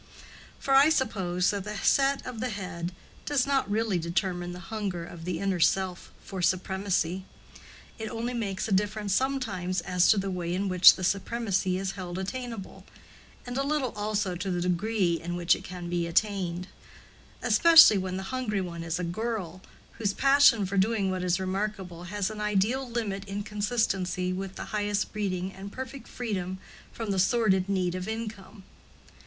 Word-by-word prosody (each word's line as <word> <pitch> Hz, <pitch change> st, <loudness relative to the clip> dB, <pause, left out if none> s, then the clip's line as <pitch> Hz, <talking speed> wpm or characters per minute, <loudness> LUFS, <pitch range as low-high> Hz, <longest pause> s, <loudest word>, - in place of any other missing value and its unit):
For 270 Hz, -, -1 dB
I 275 Hz, +3 st, +7 dB
suppose 190 Hz, -, +1 dB
that 200 Hz, -2 st, -3 dB
the 210 Hz, +1 st, -5 dB
set 275 Hz, +6 st, +2 dB
of 235 Hz, -, -6 dB
the 250 Hz, +3 st, -1 dB
head 180 Hz, -4 st, -5 dB, 0.4 s
does 285 Hz, -4 st, +2 dB
not 275 Hz, -5 st, +1 dB
really 210 Hz, -3 st, +1 dB
determine 175 Hz, +1 st, -2 dB
the 180 Hz, -, -8 dB
hunger 195 Hz, -6 st, -3 dB
of 170 Hz, -1 st, -10 dB
the 180 Hz, -2 st, -2 dB
inner 195 Hz, -1 st, -1 dB
self 185 Hz, +1 st, +1 dB
for 190 Hz, -2 st, -6 dB
supremacy: 185 Hz, 0 st, 0 dB, 0.8 s
it 220 Hz, -1 st, -4 dB
only 235 Hz, +2 st, -3 dB
makes 200 Hz, -5 st, -2 dB
a -, -, -5 dB
difference 205 Hz, +1 st, 0 dB
sometimes 205 Hz, -9 st, 0 dB
as 180 Hz, +1 st, +2 dB
to 215 Hz, -, +6 dB
the 195 Hz, 0 st, -1 dB
way 175 Hz, -1 st, -2 dB
in 195 Hz, +2 st, -1 dB
which 180 Hz, -1 st, +8 dB
the 185 Hz, -, -6 dB
supremacy 195 Hz, -1 st, 0 dB
is 190 Hz, 0 st, -2 dB
held 185 Hz, -2 st, -6 dB
attainable, 230 Hz, +1 st, -6 dB, 0.6 s
and 245 Hz, +1 st, -3 dB
a -, -, +1 dB
little 280 Hz, -4 st, 0 dB
also 210 Hz, -2 st, -1 dB
to 190 Hz, +3 st, -4 dB
the 175 Hz, -1 st, -1 dB
degree 180 Hz, -1 st, 0 dB
in 175 Hz, +1 st, -4 dB
which 170 Hz, -1 st, +3 dB
it -, -, -10 dB
can 180 Hz, -1 st, -7 dB
be 175 Hz, -1 st, -1 dB
attained; 180 Hz, -1 st, 0 dB, 0.8 s
especially 330 Hz, -11 st, +8 dB
when 185 Hz, 0 st, -3 dB
the 190 Hz, -, -4 dB
hungry 235 Hz, -6 st, -1 dB
one 170 Hz, -3 st, -5 dB
is 165 Hz, +1 st, -2 dB
a 180 Hz, -, -3 dB
girl, 185 Hz, -1 st, -3 dB, 0.4 s
whose 205 Hz, -3 st, 0 dB
passion 275 Hz, -6 st, +5 dB
for 195 Hz, +2 st, -3 dB
doing 200 Hz, -1 st, +1 dB
what 185 Hz, -1 st, -2 dB
is 180 Hz, 0 st, +1 dB
remarkable 190 Hz, -2 st, -3 dB
has 200 Hz, +2 st, -2 dB
an 215 Hz, -1 st, -6 dB
ideal 210 Hz, +6 st, 0 dB
limit 215 Hz, -5 st, -3 dB
in 200 Hz, +1 st, -4 dB
consistency 200 Hz, -4 st, -1 dB
with 190 Hz, +1 st, -5 dB
the -, -, -6 dB
highest 205 Hz, 0 st, -1 dB
breeding 190 Hz, -3 st, -2 dB
and 195 Hz, +1 st, -9 dB
perfect 260 Hz, +2 st, -7 dB
freedom 190 Hz, -6 st, -4 dB, 0.3 s
from 225 Hz, -3 st, -4 dB
the 190 Hz, -, 0 dB
sordid 190 Hz, -2 st, +2 dB
need 185 Hz, -3 st, 0 dB
of 185 Hz, +1 st, -4 dB
income. 220 Hz, -3 st, -6 dB
195 Hz, 175 wpm, -28 LUFS, 180-220 Hz, 0.8 s, which